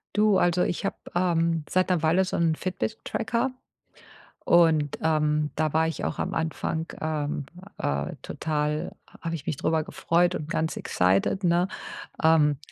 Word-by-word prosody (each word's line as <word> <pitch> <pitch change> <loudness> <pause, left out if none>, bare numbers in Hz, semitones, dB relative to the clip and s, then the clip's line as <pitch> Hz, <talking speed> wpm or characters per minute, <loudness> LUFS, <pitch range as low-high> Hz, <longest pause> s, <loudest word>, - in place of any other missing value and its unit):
Du, 210 -2 +4
also, 175 0 +3
ich - - -2
habe, - - -1 0.2
ähm, 170 -3 +1
seit 185 0 +2
'ner 180 -3 +2
Weile 165 +4 +3
so 185 - -2
'n 165 -2 +2
Fitnesstracker 225 +7 -2 0.9
und, 160 -4 +4
ähm, 150 -1 +1
da 155 -1 0
war 160 +1 +2
ich 165 - -4
auch - - -3
am - - -2
Anfang, 160 0 -2
ähm, 150 -3 -2 0.3
äh, 70 0 -2
total 150 -1 -2 0.3
habe 165 0 -3
ich 150 -4 -6
mich 150 - -1
drüber 160 +3 +1
gefreut 175 +2 +1
und 150 - -4
ganz 160 0 -1
excited, 95 - +1
ne? 175 +1 +3 0.5
Ähm, 155 -3 +4
160 Hz, 150 wpm, -26 LUFS, 150-175 Hz, 0.9 s, Du